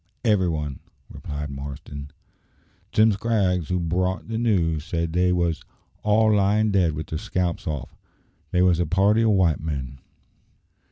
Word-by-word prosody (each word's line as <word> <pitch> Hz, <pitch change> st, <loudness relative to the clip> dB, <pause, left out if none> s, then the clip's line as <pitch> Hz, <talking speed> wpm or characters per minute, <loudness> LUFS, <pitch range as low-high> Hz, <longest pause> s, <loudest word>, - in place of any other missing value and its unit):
"Every 100 Hz, -5 st, +3 dB
one," 75 Hz, -4 st, -3 dB, 0.3 s
replied 75 Hz, 0 st, -6 dB
Marston. 70 Hz, +1 st, -7 dB, 0.8 s
"Jim 110 Hz, +1 st, +5 dB
Scraggs, 95 Hz, -5 st, 0 dB
who 90 Hz, 0 st, 0 dB
brought 90 Hz, +4 st, -1 dB
the 115 Hz, 0 st, -2 dB
news, 85 Hz, -10 st, +1 dB
said 85 Hz, 0 st, -2 dB
they 90 Hz, +1 st, +3 dB
wos 85 Hz, -2 st, 0 dB, 0.4 s
all 110 Hz, +1 st, +3 dB
lying 105 Hz, +2 st, +2 dB
dead 90 Hz, -5 st, +2 dB
with 75 Hz, +1 st, -5 dB
their 80 Hz, -, -4 dB
scalps 90 Hz, -2 st, -2 dB
off. 70 Hz, -5 st, -4 dB, 0.5 s
They 90 Hz, +3 st, +2 dB
wos 90 Hz, -2 st, +3 dB
a 85 Hz, -, +1 dB
party 100 Hz, +6 st, +3 dB
o' 115 Hz, -, +3 dB
white 95 Hz, -7 st, +3 dB
men." 70 Hz, -4 st, -5 dB
90 Hz, 150 wpm, -24 LUFS, 80-100 Hz, 0.8 s, Jim